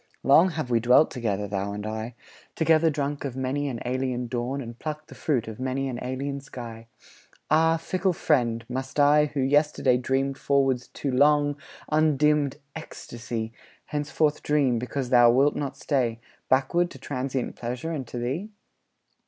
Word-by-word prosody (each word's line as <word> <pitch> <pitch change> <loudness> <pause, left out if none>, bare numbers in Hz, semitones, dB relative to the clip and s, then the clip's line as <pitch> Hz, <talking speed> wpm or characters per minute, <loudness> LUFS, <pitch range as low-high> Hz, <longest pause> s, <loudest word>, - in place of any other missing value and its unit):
Long 155 +8 +6
have 155 -7 -4
we 115 - +4
dwelt 125 +6 +5
together, 105 -5 -2
thou 100 0 -3
and 105 0 -5
I; 110 +2 -5 0.4
Together 160 0 +4
drunk 145 -1 -2
of 135 -3 -4
many 130 +2 -1
an 125 -4 -4
alien 125 0 -1
dawn, 125 +3 -3
And 120 -3 -8
plucked 155 0 -6
the - - -10
fruit 130 -8 -1
of 110 0 -8
many 130 +1 -1
an 125 -2 -4
alien 135 +2 -3
sky. 115 -4 -9 0.6
Ah, 165 +1 +4
fickle 185 +3 0
friend, 120 -9 +1
must 130 +3 -4
I, 150 +1 +5
who 145 -2 -3
yesterday 140 -2 +3
Dreamed 135 +2 -1
forwards 135 -3 +1
to 140 - -4
long, 145 +2 +3 0.4
undimmed 150 -2 +2 0.2
ecstasy, 115 -7 -6 0.3
Henceforward 150 +1 0
dream, 140 -5 +2
because 125 +2 -4
thou 120 -1 +7
wilt 135 +5 +3
not 140 -2 -4
stay, 120 -6 0 0.3
Backward 140 +7 +2
to - - -11
transient 130 -1 -3
pleasure 125 +7 -4
and 140 -6 -4
to 120 - -7
thee? 135 - -3
135 Hz, 160 wpm, -26 LUFS, 120-150 Hz, 0.6 s, thou